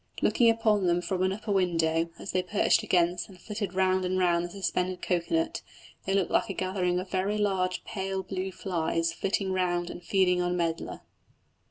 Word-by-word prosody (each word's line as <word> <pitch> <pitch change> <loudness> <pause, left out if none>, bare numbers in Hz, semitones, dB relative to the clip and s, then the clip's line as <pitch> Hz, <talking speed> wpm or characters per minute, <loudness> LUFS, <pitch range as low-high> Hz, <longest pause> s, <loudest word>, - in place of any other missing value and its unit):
Looking 235 -3 +4
upon 215 -4 +2
them 175 0 +3
from 185 +1 -2
an 185 0 +2
upper 210 +2 -4
window, 165 -3 +1
as - - -6
they 185 - +1
perched 185 +3 +2
against 175 0 +1
and 185 -2 -14
flitted 205 -1 -5
round 185 0 +2
and 185 0 0
round 175 -2 +2
the - - -6
suspended 185 -1 -2
cocoa 175 - 0
nut, 330 0 0 0.5
they 195 - +1
looked 190 -3 +1
like 230 - +2
a - - -2
gathering 185 -1 0
of 185 +1 -7
very 195 +2 0
large 190 -3 0
pale 190 -2 -3
blue 190 0 -4
flies 165 -3 -1
flitting 195 +2 -1
round 175 -1 0
and - - -9
feeding 180 -2 +2
on 175 0 0
medlar. 165 -1 -2
185 Hz, 190 wpm, -28 LUFS, 175-195 Hz, 0.5 s, Looking